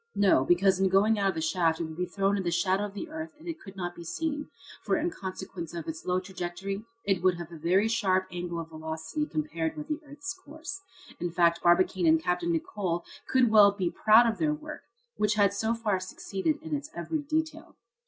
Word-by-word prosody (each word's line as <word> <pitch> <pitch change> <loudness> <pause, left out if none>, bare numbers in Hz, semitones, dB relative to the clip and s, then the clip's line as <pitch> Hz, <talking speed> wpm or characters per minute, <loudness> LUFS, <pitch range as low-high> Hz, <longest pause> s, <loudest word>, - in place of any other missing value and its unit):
No, 195 -9 +4
because 185 +4 +3
in 190 0 +3
going 205 +3 +4
out 195 -1 +3
of 190 - -2
the 160 - -2
shaft 160 0 +1
it - - -1
would 160 -1 -6
be 180 +2 -2
thrown 195 +2 +1
in 200 - 0
the 175 - -1
shadow 185 +4 +1
of 205 -1 -8
the 205 - -5
earth 315 0 -6
and 325 +3 -14
it 330 -1 -4
could 195 -1 -11
not 175 -2 -4
be 170 - -9
seen, 295 - -3 0.3
for - - +1
in 335 +3 0
consequence 185 - -6
of 165 -2 -5
its 160 0 -6
low 180 0 +2
trajectory 190 +2 -5 0.2
it 195 -3 +1
would 185 -1 +3
have 170 -1 -7
a - - -8
very 180 +7 +2
sharp 195 -5 +2
angle 175 -1 -4
of 165 -1 -6
velocity 160 - -4
compared 160 - -2
with 300 - -6
the 305 0 -1
earth's 295 +6 -6
course. 375 +2 -9 0.4
In 175 - -1
fact, 170 0 +3
Barbicane 175 0 +3
and 160 0 +6
Capt. 180 +2 0
Nicholl 170 +1 -1 0.2
could 255 -3 +3
well 205 -2 +8
be 185 -4 -1
proud 220 +2 +6
of 225 -4 0
their 150 -2 +2
work, 150 - -8 0.4
which 210 0 +2
had 200 -2 +4
so 220 +3 0
far 215 -5 0
succeeded 195 +9 -2
in 320 -2 -2
its 290 +1 -5
every 315 - -2
detail. 315 +1 -3
190 Hz, 220 wpm, -29 LUFS, 170-230 Hz, 0.4 s, well